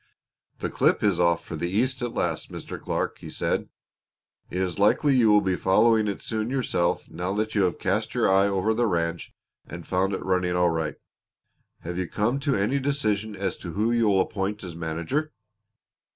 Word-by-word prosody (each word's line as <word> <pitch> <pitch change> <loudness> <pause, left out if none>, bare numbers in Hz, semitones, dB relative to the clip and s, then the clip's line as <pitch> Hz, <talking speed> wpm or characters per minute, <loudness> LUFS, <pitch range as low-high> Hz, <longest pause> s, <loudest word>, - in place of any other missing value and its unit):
"The - - -2
clip - - +2
is 100 -4 +2
off 85 -1 +2
for 80 - -6
the 85 +3 -2
East 125 +7 0
at 120 -1 -3
last, - - -2
Mr. - - -7
Clark," - - -2
he - - -9
said. - - -1 0.8
"It - - -5
is 95 0 -2
likely 135 +7 +4
you 115 -4 +5
will 105 0 +6
be 95 -2 0
following 110 +4 +3
it 100 - -4
soon 110 0 -2
yourself 125 -10 0
now 90 +4 -3
that 110 +1 -1
you 105 - +2
have 90 - -1
cast - - -1
your - - +3
eye 95 +1 +4
over 100 +2 +1
the 120 +1 +1
ranch 85 -3 -2 0.4
and 85 0 -8
found 95 +2 0
it - - -4
running 90 -1 +1
all 90 -1 +3
right. 80 -2 -2 0.9
Have 85 +2 -4
you 90 - -2
come 115 +9 0
to 140 -1 0
any 105 +8 +1
decision 110 -7 -1
as 95 -2 -2
to 85 - -7
who 110 +4 +1
you'll 110 -5 +3
appoint 100 +2 -3
as 90 -3 -7
manager?" 85 - -2
100 Hz, 195 wpm, -25 LUFS, 90-110 Hz, 0.9 s, will